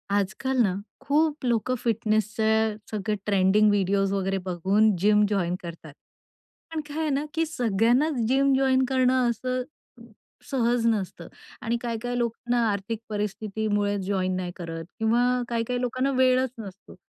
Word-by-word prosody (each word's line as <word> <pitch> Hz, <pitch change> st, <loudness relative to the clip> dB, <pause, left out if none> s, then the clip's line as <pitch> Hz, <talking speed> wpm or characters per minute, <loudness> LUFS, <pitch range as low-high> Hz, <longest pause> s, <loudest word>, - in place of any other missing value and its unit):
आज-काल 205 Hz, +7 st, -1 dB
ना, 190 Hz, -4 st, +1 dB, 0.3 s
खुप 300 Hz, -1 st, +1 dB
लोक 235 Hz, 0 st, 0 dB
फिटनेसच 220 Hz, -1 st, 0 dB
सगळ 215 Hz, 0 st, -1 dB
ट्रेंडिंग 205 Hz, +1 st, +4 dB
वीडियोस 195 Hz, 0 st, +1 dB
वैगेरे 195 Hz, 0 st, 0 dB
बघून 195 Hz, +4 st, +2 dB
जिम 210 Hz, +3 st, +4 dB
जॉइन 180 Hz, -4 st, 0 dB
करतात. 165 Hz, -3 st, -9 dB, 0.8 s
पण 315 Hz, -, -2 dB
काय 295 Hz, +1 st, -7 dB
आहे 315 Hz, -1 st, 0 dB
ना 280 Hz, +1 st, 0 dB
की 325 Hz, 0 st, +1 dB
सगळ्यांनाच 245 Hz, +2 st, +1 dB
जिम 275 Hz, +2 st, +3 dB
जॉइन 265 Hz, -1 st, +3 dB
करणं 255 Hz, -1 st, +3 dB
असं 255 Hz, +2 st, -2 dB, 0.9 s
सहज 240 Hz, -2 st, +1 dB
नसतं 195 Hz, -6 st, -2 dB, 0.3 s
आणि 235 Hz, +1 st, -1 dB
काही-काही 245 Hz, +1 st, -3 dB
लोक 235 Hz, -2 st, 0 dB, 0.2 s
ना 245 Hz, -, +3 dB
आर्थिक 200 Hz, +2 st, -3 dB
परिस्थितीमुळे 205 Hz, 0 st, -1 dB
जॉइन 185 Hz, -1 st, -1 dB
नाही 180 Hz, -1 st, -3 dB
करत 165 Hz, -2 st, -6 dB
किंवा 225 Hz, +2 st, +2 dB, 0.3 s
काही-काही 235 Hz, +1 st, -1 dB
लोकांना 255 Hz, +2 st, 0 dB
वेळच 260 Hz, 0 st, +3 dB
नसतो. 195 Hz, -3 st, -10 dB
220 Hz, 135 wpm, -26 LUFS, 200-255 Hz, 0.9 s, ट्रेंडिंग